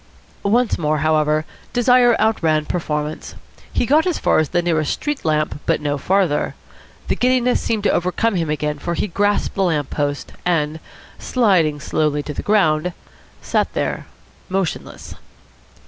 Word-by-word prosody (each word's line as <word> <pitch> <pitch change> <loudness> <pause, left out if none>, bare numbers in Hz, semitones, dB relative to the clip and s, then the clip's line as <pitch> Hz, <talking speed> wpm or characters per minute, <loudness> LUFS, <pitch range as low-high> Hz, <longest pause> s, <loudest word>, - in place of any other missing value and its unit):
Once 230 +4 +1
more, 155 -1 +1
however, 155 0 +2 0.3
desire 245 -1 +4
outran 160 -9 +2
performance. 150 -3 -3 0.4
He - - 0
got 305 +7 +3
as 355 - 0
far - - +2
as 155 - 0
the 175 -1 0
nearest 155 -3 +1
street 295 -1 -3
lamp, 155 -1 0
but - - +2
no 145 -1 -2
farther. 185 -3 +1 0.5
The - - +1
giddiness 250 0 +2
seemed 220 -3 -1
to - - +3
overcome 185 +6 0
him 165 -3 -1
again, 150 -1 -2
for 170 +3 -3
he - - 0
grasped 205 +2 0
the 195 - -2
lamp 155 -7 0
post, 145 -1 -2
and, 160 -3 0 0.4
sliding 180 - +2
slowly 150 0 0
to 150 - -5
the - - -4
ground, 180 -5 +2 0.5
sat - - 0
there - - -2 0.4
motionless. 190 -2 -3
170 Hz, 150 wpm, -20 LUFS, 150-210 Hz, 0.5 s, desire